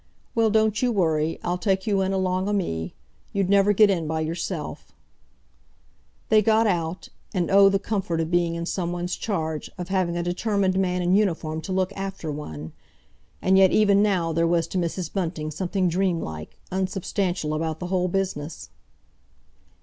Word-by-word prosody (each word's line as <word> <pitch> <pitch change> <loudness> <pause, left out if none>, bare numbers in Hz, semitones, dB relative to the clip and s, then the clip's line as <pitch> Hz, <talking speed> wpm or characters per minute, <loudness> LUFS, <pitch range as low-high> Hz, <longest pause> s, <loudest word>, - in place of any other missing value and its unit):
"Well, 225 -1 +3
don't 220 0 +2
you 250 -1 +2
worry. 160 -6 +1
I'll 175 +1 -1
take 190 0 0
you 200 -3 +1
in 190 0 0
along 185 0 0
o' - - 0
me. 80 - -2 0.4
You'd 195 -1 0
never 200 0 +5
get 205 0 +5
in 170 -4 -1
by 160 0 -1
yourself." 160 +2 -4 1.4
They 215 -1 +6
got 220 +1 +3
out; 175 -3 -1 0.3
and 180 -1 0
oh, 195 0 +7
the 195 - +2
comfort 195 -4 -2
of 165 +1 -2
being 170 -1 +2
in 170 0 -3
some 175 -1 -2
one's 175 0 -3
charge, 160 -7 -3
of 180 0 -6
having 185 -3 0
a 175 - -1
determined 190 +1 0
man 180 -1 0
in 175 +1 +2
uniform 165 -6 +1
to 190 - -6
look 185 +1 0
after 195 -5 -5
one! 80 - -7 0.7
And 190 +1 +5
yet 190 -1 +7
even 200 -1 +4
now 180 -6 +1
there 165 +1 +2
was 170 -1 +2
to 185 - -1
Mrs. 170 0 -3
Bunting 160 -5 -2
something 185 +3 -1
dream 180 0 +1
like, 80 - -7
unsubstantial 185 -3 -1
about 160 0 -2
the 180 - -4
whole 180 -1 +2
business. 175 -5 -3
185 Hz, 175 wpm, -24 LUFS, 165-195 Hz, 1.4 s, oh